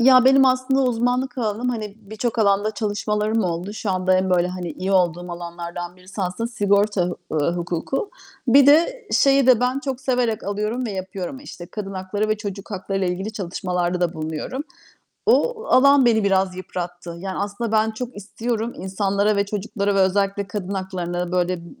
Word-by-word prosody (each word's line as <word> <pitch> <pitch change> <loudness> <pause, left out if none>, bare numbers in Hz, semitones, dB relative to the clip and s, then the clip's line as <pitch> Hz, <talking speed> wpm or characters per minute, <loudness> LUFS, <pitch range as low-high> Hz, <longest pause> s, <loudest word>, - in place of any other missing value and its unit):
Ya, 255 +1 +7
benim 270 0 +6
aslında 255 +1 +2
uzmanlık 250 +2 0
alanım, 225 +2 -1
hani, 215 -4 -3
birçok 220 +3 -4
alanda 205 0 +3
çalışmalarım 210 0 0
oldu. 175 +3 -3
Şu 215 -2 -3
anda 185 0 +2
en, 185 0 0
böyle, 180 0 +3
hani, 180 -2 -5
iyi 190 +2 -3
olduğum 175 -1 +1
alanlardan 175 +1 -6
birisi 185 +2 -7
aslında 185 +6 -2
sigorta 205 -3 +2
hu 175 - -4 0.2
ııı, 155 +3 +1
hukuku. 175 - -2 0.4
Bir 275 +3 +7
de 420 +11 +4
şeyi 275 -1 +4
de 250 -3 +6
ben 250 +2 +1
çok 270 -3 -4
severek 250 -4 0
alıyorum 210 +5 -2
ve 220 - -3
yapıyorum, 190 +5 -5
işte, 175 -11 -9
kadın 195 0 -6
hakları 195 +3 -2
ve 215 - +1
çocuk 205 0 -7
haklarıyla 195 -1 -2
ilgili 190 +4 -3
çalışmalarda 180 -2 -2
da 175 -2 +1
bulunuyorum. 160 - -4 0.6
O 470 +1 +3
alan 280 +1 +6
beni 220 -3 +3
biraz 190 -2 +2
yıprattı. 175 -2 -6
Yani, 190 +1 -5
aslında 205 +3 -3
ben 220 0 +3
çok 240 +1 -6
istiyorum 225 +3 -3
insanlara 200 +2 0
ve 200 - +2
çocuklara 205 0 -2
ve 195 - +3
özellikle 195 +1 +1
kadın 195 0 -4
haklarına 180 -2 -3
böyle, 180 0 +1
ııı, 170 -1 -9
200 Hz, 175 wpm, -22 LUFS, 185-235 Hz, 0.6 s, Ya